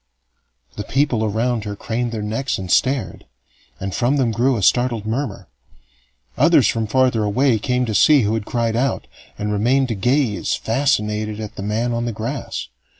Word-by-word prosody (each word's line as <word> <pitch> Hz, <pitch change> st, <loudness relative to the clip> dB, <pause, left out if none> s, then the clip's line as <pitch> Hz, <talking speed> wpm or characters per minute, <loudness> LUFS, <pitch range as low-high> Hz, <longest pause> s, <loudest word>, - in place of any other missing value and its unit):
The 105 Hz, -, -3 dB
people 130 Hz, -4 st, 0 dB
around 110 Hz, +2 st, 0 dB
her 105 Hz, -1 st, -4 dB
craned 120 Hz, +3 st, -3 dB
their 110 Hz, -2 st, -4 dB
necks 115 Hz, +6 st, -2 dB
and 95 Hz, -1 st, -5 dB
stared, 130 Hz, -1 st, 0 dB, 0.5 s
and 95 Hz, -1 st, -4 dB
from 125 Hz, +7 st, +1 dB
them 125 Hz, -4 st, +1 dB
grew 125 Hz, +3 st, +1 dB
a 100 Hz, -, -3 dB
startled 120 Hz, -1 st, +2 dB
murmur. 110 Hz, -4 st, -3 dB, 0.9 s
Others -, -, +5 dB
from 115 Hz, -1 st, -1 dB
farther 125 Hz, -1 st, +2 dB
away 115 Hz, +3 st, +2 dB
came 125 Hz, +3 st, 0 dB
to 110 Hz, -, -3 dB
see 150 Hz, +6 st, +5 dB
who 105 Hz, +1 st, 0 dB
had 110 Hz, -1 st, -1 dB
cried 115 Hz, -1 st, -1 dB
out, 135 Hz, +3 st, 0 dB, 0.3 s
and 105 Hz, 0 st, -2 dB
remained 125 Hz, +6 st, +2 dB
to -, -, 0 dB
gaze 120 Hz, +2 st, 0 dB
fascinated 110 Hz, -4 st, -1 dB
at 110 Hz, -1 st, -6 dB
the -, -, -6 dB
man 110 Hz, +4 st, -1 dB
on 120 Hz, 0 st, -1 dB
the 120 Hz, -, -2 dB
grass. 110 Hz, -, -5 dB
115 Hz, 175 wpm, -20 LUFS, 105-125 Hz, 0.9 s, Others